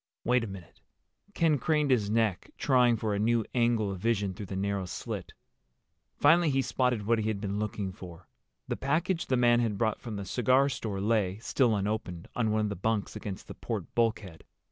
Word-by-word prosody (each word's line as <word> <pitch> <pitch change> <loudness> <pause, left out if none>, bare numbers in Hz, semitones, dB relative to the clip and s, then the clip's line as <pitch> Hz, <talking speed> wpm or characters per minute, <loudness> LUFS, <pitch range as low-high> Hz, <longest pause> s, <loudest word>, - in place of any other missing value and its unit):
"Wait 125 0 +2
a - - -3
minute." 95 -4 -11 0.5
Ken 160 -4 +3
craned 150 +1 +1
his 110 -5 +2
neck, 110 -4 0
trying 125 -4 +3
for 110 -1 -1
a 100 - -1
new 115 +1 +2
angle 115 -4 +2
of 95 - -5
vision 100 -2 0
through 100 +2 -8
the 95 - -5
narrow 100 0 -1
slit. - - -5 0.8
Finally 165 +3 +5
he 135 -1 +1
spotted 125 -6 0
what 115 +1 +2
he 110 - -1
had 110 -2 -1
been 100 0 -3
looking 105 -2 -3
for. 90 -2 -11 0.4
The - - -2
package 165 +6 0
the 130 - +2
man 120 -1 +4
had 110 -4 0
brought 110 0 0
from 115 -3 -6
the 100 -1 -5
cigar 130 +6 +3
store 105 -6 -4
lay, 105 -3 +1
still 115 0 +1
unopened, 100 -4 -3
on 115 -3 +1
one 110 0 +1
of 105 - 0
the 100 - -3
bunks 105 +2 -1
against 100 -2 -6
the - - -7
port - - -5
bulkhead. 110 -8 -1
110 Hz, 200 wpm, -29 LUFS, 100-125 Hz, 0.8 s, Finally